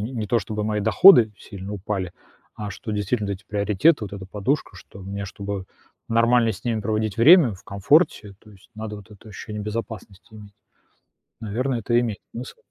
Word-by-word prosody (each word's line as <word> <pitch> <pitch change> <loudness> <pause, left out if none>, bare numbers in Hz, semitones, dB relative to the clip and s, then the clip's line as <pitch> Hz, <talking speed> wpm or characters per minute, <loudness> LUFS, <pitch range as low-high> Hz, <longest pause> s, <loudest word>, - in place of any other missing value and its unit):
не 110 -2 -2
то 120 +3 +2
чтобы 105 +1 -4
мои 105 0 -1
доходы 115 - +7
сильно 100 0 -9
упали, 95 -2 -4 0.4
а 105 -1 -6
что, 110 - -7
действительно, 105 +1 -1
эти 95 - -7
приоритеты, 105 - +2
вот 100 - -9
эта 95 -2 -7
подушка, 105 +4 -2
что 95 +2 -14
мне, 100 +1 -5
чтобы 100 -1 -6 0.4
нормально 115 0 +3
с 100 0 -11
ними 115 -2 -1
проводить 110 -1 -2
время 145 - +7
в 90 - -15
комфорте, 100 - +1
то 110 - -19
есть 100 -1 -20
надо, 110 -1 -6
вот, 105 +1 -15
это 105 +1 -15
ощущение 105 0 -7
безопасности 110 -1 -7
иметь. 105 -1 -13 0.9
Наверно, 120 +5 -2
это 120 +1 +1
имеет 115 -4 -2
смысл. 120 +3 -8
105 Hz, 175 wpm, -23 LUFS, 100-115 Hz, 0.9 s, доходы